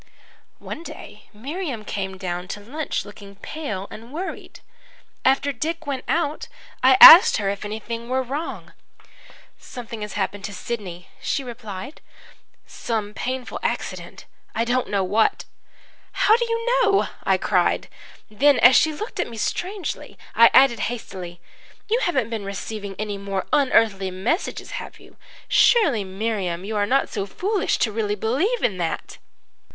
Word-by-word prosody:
"One - - -8
day 335 - -11
Miriam 265 - -5
came 190 -2 -4
down 180 -1 -4
to 205 - -6
lunch 275 +9 -4
looking 200 -1 -12
pale 210 -5 -6
and 230 +3 -11
worried. 360 +6 -7 0.6
After 270 +2 +3
Dick 320 +5 -4
went 275 -3 -4
out, 315 -2 -1 0.3
I 260 0 +6
asked 345 - +11
her 200 -2 -1
if 200 0 -6
anything 230 +3 -6
were 260 +1 0
wrong. 285 +6 -6 0.9
"'Something 235 -3 -8
has 210 -1 -5
happened 200 0 -3
to 205 - -6
Sidney,' 185 -6 -6
she 275 - -1
replied, 235 +1 -8 0.6
'some 215 -3 -4
painful 255 +2 -4
accident - - -4 0.3
I 230 - +1
don't 250 +1 0
know 200 -2 +1
what.' 210 +4 +1 0.7
"'How 435 - +4
do 475 +1 0
you 460 0 -2 0.2
know?' 400 -4 +3 0.2
I - - +2
cried. - - +1 0.4
Then, 275 +6 +3
as 245 +2 +7
she 315 - +4
looked 420 +10 -7
at - - -1
me 230 - -9
strangely, 370 - -4 0.2
I 230 0 +7
added 265 -3 +5
hastily, 185 -7 -7 0.5
'You 460 +3 +1
haven't 265 - 0
been 220 -3 -3
receiving 200 0 -6
any 205 -1 -4
more 195 -1 -3
unearthly 225 -9 +3
messages, 195 - -2
have - - -11
you? - - -18 0.3
Surely, 315 - +4
Miriam, 190 -2 -3
you 215 +1 -4
are 205 -1 +1
not 270 +4 +2
so 200 -2 -3
foolish 395 - -1
as - - 0
to 220 - 0
really 210 -1 -1
believe 290 - 0
in 195 - +1
that!' 165 -2 -4
230 Hz, 150 wpm, -23 LUFS, 200-285 Hz, 0.9 s, asked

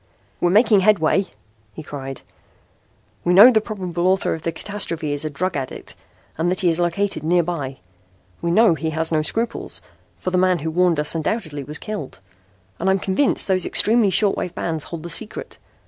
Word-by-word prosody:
"We're 175 - +2
making 210 +2 +5
headway," 190 -1 +2 0.5
he 155 - -9
cried. 135 -3 -7 1.0
"We 175 - +2
know 220 +7 +10
the 220 -3 +3
probable 185 -5 -3
author 190 +1 +1
of 160 - -6
the 165 - -2
catastrophe 165 -5 -3
is 145 +1 -1
a 155 - -2
drug 180 +6 -3
addict 135 -2 -6 0.4
and 170 +2 +1
that 185 - 0
he 180 - +3
is 165 +1 +1
located 175 0 -1
nearby. 165 -5 -1 0.6
We 170 - -1
know 215 +2 +5
he 160 0 -3
has 160 +1 -1
no 155 -1 +2
scruples, 225 +9 -3 0.4
for 185 - -4
the 180 - +2
man 185 -1 +3
who 160 0 -4
warned 175 -1 +2
us 150 - +2
undoubtedly 160 -3 -2
was 150 +3 -5
killed. 210 - -7 0.6
And 190 - 0
I'm 190 - +3
convinced 195 +9 0
those 185 -2 +2
extremely 220 +2 +3
short 200 +1 +2
wave 180 - -4
bands 160 -3 -3
hold 165 -2 -7
the 170 - -5
secret. 215 +7 -4
175 Hz, 185 wpm, -21 LUFS, 160-195 Hz, 1.0 s, know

